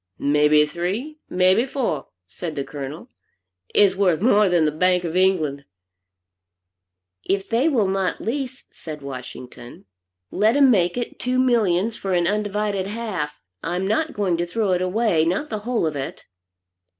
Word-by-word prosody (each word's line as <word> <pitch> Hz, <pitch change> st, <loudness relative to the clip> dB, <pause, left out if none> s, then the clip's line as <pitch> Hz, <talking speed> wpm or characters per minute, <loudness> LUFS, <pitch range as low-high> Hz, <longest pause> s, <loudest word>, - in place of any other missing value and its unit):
"May 150 Hz, +1 st, +3 dB
be 150 Hz, 0 st, +5 dB
three, 200 Hz, -, -4 dB
may 185 Hz, 0 st, +4 dB
be 230 Hz, +7 st, +1 dB
four," 235 Hz, -, -2 dB, 0.2 s
said 155 Hz, -, -7 dB
the 140 Hz, -, -2 dB
Colonel, 145 Hz, -, -8 dB, 0.6 s
"it's 200 Hz, -2 st, +4 dB
worth 185 Hz, -4 st, +2 dB
more 210 Hz, -1 st, +4 dB
than 175 Hz, -3 st, +3 dB
the 150 Hz, -, +2 dB
bank 180 Hz, +3 st, +2 dB
of 170 Hz, -1 st, -4 dB
England." 165 Hz, -7 st, +1 dB, 1.6 s
"If 195 Hz, 0 st, -1 dB
they 245 Hz, +7 st, +2 dB
will 230 Hz, -9 st, +2 dB
not 190 Hz, -1 st, -1 dB
lease," 260 Hz, +2 st, -4 dB
said 150 Hz, -3 st, -9 dB
Washington, 125 Hz, -2 st, -9 dB, 0.5 s
"let 215 Hz, +5 st, +2 dB
'em 275 Hz, -2 st, +6 dB
make 180 Hz, -2 st, +2 dB
it 240 Hz, -, -4 dB
two 250 Hz, 0 st, -1 dB
millions 225 Hz, -5 st, +2 dB
for 195 Hz, -1 st, -3 dB
an 175 Hz, -1 st, +2 dB
undivided 205 Hz, -1 st, -1 dB
half. 195 Hz, -9 st, -4 dB, 0.2 s
I'm 180 Hz, +3 st, -2 dB
not 300 Hz, +9 st, 0 dB
going 190 Hz, -5 st, 0 dB
to 175 Hz, -, -1 dB
throw 210 Hz, +1 st, 0 dB
it 180 Hz, 0 st, +1 dB
away, 185 Hz, -3 st, +1 dB
not 185 Hz, -, -1 dB
the 215 Hz, -, -2 dB
whole 230 Hz, -3 st, -1 dB
of 155 Hz, -2 st, -2 dB
it." 135 Hz, -1 st, -6 dB
190 Hz, 160 wpm, -22 LUFS, 160-225 Hz, 1.6 s, em